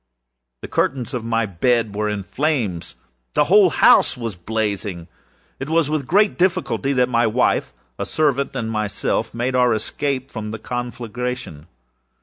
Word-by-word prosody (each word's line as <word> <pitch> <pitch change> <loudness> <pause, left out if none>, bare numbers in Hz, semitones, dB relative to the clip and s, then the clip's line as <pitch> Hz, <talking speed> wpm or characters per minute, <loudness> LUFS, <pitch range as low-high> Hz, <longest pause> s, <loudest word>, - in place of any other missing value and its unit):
The - - -4
curtains 130 0 -1
of 125 -3 -3
my 115 0 0
bed 110 +3 +1
were 105 +1 -1
in 105 -1 -3
flames. 105 - -2 0.4
The 150 - +5
whole 195 +3 +5
house 145 - +5
was 115 -4 -4
blazing. 100 -2 -3 0.5
It 135 - -5
was 160 -2 +2
with 150 -4 -1
great 205 +3 +3
difficulty 180 -6 +1
that 125 -2 +3
my 120 -1 +2
wife, 110 - +1 0.3
a - - -1
servant, 140 -3 0
and 115 -3 -2
myself, 105 -2 -1
made 120 +2 -1
our 125 -2 +3
escape 135 +4 -3
from 110 -2 -5
the 110 - -5
conflagration. 120 -7 -5
120 Hz, 150 wpm, -21 LUFS, 105-135 Hz, 0.5 s, The